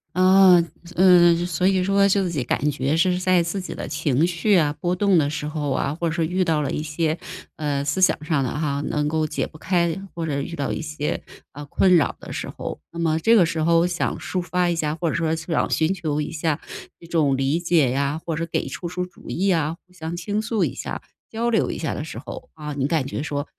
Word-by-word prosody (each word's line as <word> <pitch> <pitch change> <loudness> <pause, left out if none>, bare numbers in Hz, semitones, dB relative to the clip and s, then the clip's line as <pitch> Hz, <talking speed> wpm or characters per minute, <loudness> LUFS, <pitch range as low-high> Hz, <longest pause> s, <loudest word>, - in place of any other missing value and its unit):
啊， 185 -1 +6 0.3
嗯， 175 -2 +6
所 180 +1 0
以 190 -1 +2
说 200 +1 +3
就 195 -2 +2
己 150 -5 -2
感 150 +2 0
觉 140 +2 -1
是 180 +2 +2
在 185 -2 +3
自 170 +4 -3
己 180 - -6
的 - - -5
情 150 -1 +1
绪 180 +4 +1
啊， 150 -4 +3
波 180 -1 0
动 195 -1 +3
的 145 -2 +2
时 150 0 -4
候 150 -2 -3
啊， 140 +2 0
或 170 - 0
者 160 - -1
说 170 -2 0
遇 180 +4 0
到 160 -2 +1
了 140 - -2
一 - - -2
些， 155 +1 -1 0.4
呃， 145 -2 -1
思 150 +6 -1
想 180 -4 +3
上 155 -3 0
的 130 - -1
哈， 145 -2 -2
能 150 0 0
够 155 0 0
解 - - -2
不 155 - -13
开， 170 -1 +1 0.2
或 165 - -3
者 145 -3 -1
遇 170 +4 -5
到 140 -3 -2
一 - - -3
些， 150 -1 -3 0.3
呃， 145 0 -9
困 180 +5 +4
扰 160 - +1
的 - - -10
时 - - -4
候， - - -6
那 - - -8
么 160 -1 +1
这 225 +8 +4
个 180 -6 +6
时 160 0 -2
候 165 +1 +4
想 175 -1 -2
抒 185 - -3
发 180 0 0
一 170 - 0
下， 150 -1 -1
或 165 -1 -1
者 - - -2
说 165 -1 0
想 160 +1 -1
寻 160 +4 +1
求 155 -5 -2
一 150 - -4
下 160 -1 -1 0.4
这 170 - -15
种 155 -5 +2
理 135 +5 +1
解 165 -7 +2
呀， 140 +4 -1
或 165 -3 -2
者 - - -3
是 - - -1
给 - - -2
出 175 - -5
出 180 +1 -3
主 180 - -14
意 190 +3 -1
呀， 165 -4 +1
互 180 - -31
相 170 -1 -6
倾 205 +4 -2
诉 220 -1 0
一 - - -1
下 - - -5 0.3
交 230 +1 -1
流 220 - +1
一 - - -3
下 160 - -2
的 150 - -4
时 115 - -8
候， 140 - -9
啊， 150 -1 -6
你 140 -1 -1
感 155 -4 0
觉 140 - -4
说， 145 -2 -3
165 Hz, 265 characters per minute, -23 LUFS, 150-180 Hz, 0.4 s, 啊